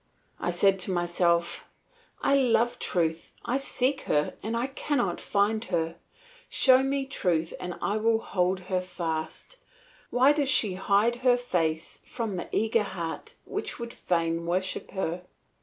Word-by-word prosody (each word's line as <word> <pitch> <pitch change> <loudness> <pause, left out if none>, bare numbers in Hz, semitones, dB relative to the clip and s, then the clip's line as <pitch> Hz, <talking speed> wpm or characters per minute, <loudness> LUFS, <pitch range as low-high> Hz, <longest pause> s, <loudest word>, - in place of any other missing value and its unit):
I - - -1
said 195 -1 +3
to 185 - 0
myself, 175 -1 +1 0.6
"I - - +3
love 240 -3 +3
truth, 165 -2 -1
I 250 - +1
seek 270 0 0
her, 150 0 +1
and 225 +3 -3 0.2
cannot 245 - -1
find 210 +2 +1
her. 165 -3 -1 0.5
Show 260 -1 +5
me 270 0 0
truth 170 - -1
and 180 -1 -5
I 205 - +1
will 225 +1 +3
hold 185 -3 0
her 185 0 -1
fast; 165 - -5 0.5
why 260 +4 +5
does 290 -2 0
she 215 -7 +3
hide 200 +5 +2
her 250 0 +4
face 165 -9 -1
from 225 -5 -4
the 175 - -5
eager 220 +1 +2
heart 190 - -5
that - - -4
would 235 0 -6
fain 165 -1 -1
worship 185 +2 -1
her?" 180 -2 -3
195 Hz, 145 wpm, -27 LUFS, 175-240 Hz, 0.6 s, Show